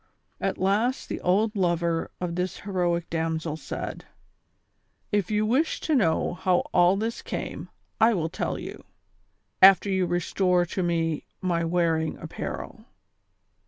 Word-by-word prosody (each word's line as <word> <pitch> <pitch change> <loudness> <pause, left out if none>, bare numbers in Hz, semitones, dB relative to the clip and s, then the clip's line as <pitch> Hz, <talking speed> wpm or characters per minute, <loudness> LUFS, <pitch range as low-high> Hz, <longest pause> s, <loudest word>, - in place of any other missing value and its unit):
At - - -1
last 210 +7 0
the - - -4
old 210 +5 +2
lover 170 -3 0
of 180 -2 -3
this 180 +1 -3
heroic 175 -4 -1
damsel 160 -1 -1
said: 145 -4 -6 0.5
" - - -47 0.3
If 205 -4 +1
you 210 0 +1
wish 265 +9 +1
to 315 - 0
know 175 - +2
how 180 0 +2
all 180 +2 +5
this 225 +3 -3
came, - - -5 0.3
I 225 0 +5
will 165 -3 0
tell 165 - -3
you, - - -8 0.8
after 195 +1 +7
you 190 -1 +1
restore 175 +1 +1
to 185 - -3
me 165 -3 0
my 175 -3 0
wearing 165 -2 0
apparel." - - -7
180 Hz, 140 wpm, -26 LUFS, 170-200 Hz, 0.8 s, after